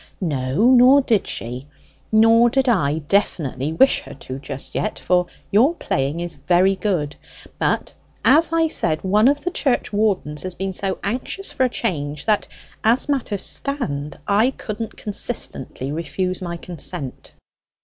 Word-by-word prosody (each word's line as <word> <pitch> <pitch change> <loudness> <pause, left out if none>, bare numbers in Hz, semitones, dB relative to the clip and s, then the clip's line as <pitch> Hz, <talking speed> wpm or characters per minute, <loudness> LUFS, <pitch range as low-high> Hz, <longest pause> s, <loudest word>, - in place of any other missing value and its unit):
"No, 150 - +1
nor 260 +3 +7
did 225 -6 +1
she. 125 +4 -4 0.4
Nor 225 +2 +6
did 265 +2 +1
I 155 - +2
definitely 155 -7 0
wish 265 +12 +4
her - - -11
to 130 -1 -7
just 135 -1 -8
yet; 215 - -2
for 180 -1 +1 0.2
your 255 +12 +4
playing 140 - -2
is 175 -1 -4
very 185 +2 +4
good. 175 -7 -1 0.4
But, - - 0 0.3
as 325 +3 +5
I 330 0 +3
said, 160 - -1
one 210 +5 +4
of 285 +1 +2
the 360 - -1
churchwardens 205 - 0
has 185 -1 -5
been 190 0 -3
so 190 +1 -2
anxious 255 - -2
for 260 - +1
a - - +1
change, 150 -11 -3
that, 215 -2 +1 0.4
as 230 +4 +3
matters 245 -8 0
stand, 150 - -2
I 210 +5 +4
couldn't 225 -3 -6
consistently 200 - -3
refuse 170 +4 -3
my 170 -1 -4
consent." 170 -4 -5
195 Hz, 150 wpm, -21 LUFS, 150-235 Hz, 0.4 s, nor